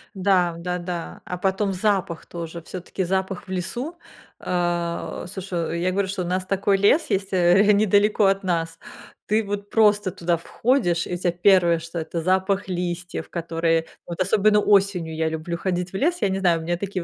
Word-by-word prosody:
Да, 185 -3 +2
да-да. 175 0 -5
А 180 - -4
потом 195 +2 0
запах 185 -3 -1
тоже 170 0 -7
всё-таки 185 +2 -5
запах 190 +1 -2
в - - -9
лесу 240 - -3 0.5
А, 175 -1 -2
слушай, 175 -3 -3
я 185 - +1
говорю, 195 +1 0
что 190 0 -3
у - - -5
нас 185 +1 -1
такой 195 +1 +1
лес 205 - +3
есть, 195 0 -1
э, 185 +3 +5
недалеко 210 +1 +3
от 195 0 +2
нас, 165 -2 -2 0.5
ты 215 +1 +2
вот 205 0 -5
просто 205 -3 +3
туда 170 0 -1
входишь, 175 -2 0
и 180 - -3
тебе 175 -1 0
1, 175 -2 +4
что 165 +1 -6
это 165 +1 -4
запах 190 +3 +1
листьев, 175 -1 -4
которые 165 -1 0 0.2
Вот 170 +1 -4
особенно 210 +2 +3
осенью 195 -5 +2
я 160 0 -1
люблю 160 +2 -3
ходить 180 0 -2
в - - -10
лес, 345 - +1
я 200 - +2
не 190 0 -1
знаю, 175 -3 +3
у - - -7
меня 175 +1 -1
такие 190 -1 -4
185 Hz, 180 wpm, -23 LUFS, 170-200 Hz, 0.5 s, э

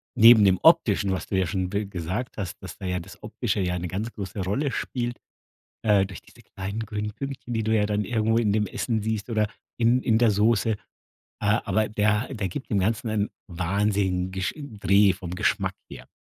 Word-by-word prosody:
neben 115 -1 +8
dem 95 -1 +4
Optischen, 110 - +4
was 95 - -2
du 95 - -1
ja 95 - +1
schon 95 0 -2
be 100 +1 -2
gesagt 95 +8 -4
hast, 95 -4 -4
dass - - -9
da 95 - -8
ja 90 0 -1
das 90 +4 -12
Optische 105 -1 -2
ja 90 -1 0
'ne 90 - -4
ganz 105 +6 -4
große 100 -1 -6
Rolle 135 +9 -1
spielt, 120 -1 -3 0.7
äh, 105 -3 +4
durch 95 0 -9
diese 120 - -19
kleinen 100 0 -6
grünen 105 0 -4
Pünktchen, 135 0 -6
die 110 - 0
du 110 +1 +1
ja 105 -1 +3
dann 105 0 -1
irgendwo 110 0 +1
in 105 -3 +2
dem 105 -1 +2
Essen 115 -3 -2
siehst 110 +1 -3
oder 110 -2 +1 0.3
in 120 +2 +3
in 110 -3 +2
der 115 -2 +4
Soße. 110 +1 +2
Äh, 105 - -1 0.6
aber 105 0 +1
der 105 +4 +1
der 100 -4 -2
gibt 130 +10 -7
dem 105 - +2
Ganzen 110 +4 0
einen 105 -1 0 0.2
wahnsinnigen 95 +1 0
Gesch 95 0 -2
Dreh 105 -8 +3
vom 90 -2 -7
Geschmack - - 0 0.2
her. - - -10
105 Hz, 205 wpm, -25 LUFS, 95-110 Hz, 0.7 s, neben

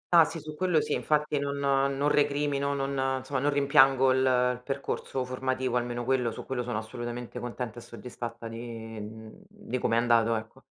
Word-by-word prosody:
Ah 165 -1 +9
sì, 165 - -5
su 155 0 -8
quello 180 -1 +2
sì, - - -1
infatti 150 -1 +1
non 140 0 -2
non 140 0 +1
recrimino, 145 -1 +1
non 135 -1 0
insomma 130 +1 -3
non 140 +3 +2
rimpiango 135 -2 +5
il 130 - +3
il 125 -1 +2
percorso 135 -1 -3
formativo, 130 0 -1
almeno 120 0 -1
quello 130 -2 +2
su 110 - -8
quello 130 -2 -2
sono 120 -3 -3
assolutamente 120 +2 -5
contenta 120 -1 -5
e - - -10
soddisfatta 115 0 -7
di, 115 0 -7
mhmm, 110 -2 -8 0.2
di 205 -11 -5
come 115 - +1
è - - +4
andato, 115 -1 +3
ecco. 110 0 -7
130 Hz, 185 wpm, -28 LUFS, 120-140 Hz, 0.2 s, Ah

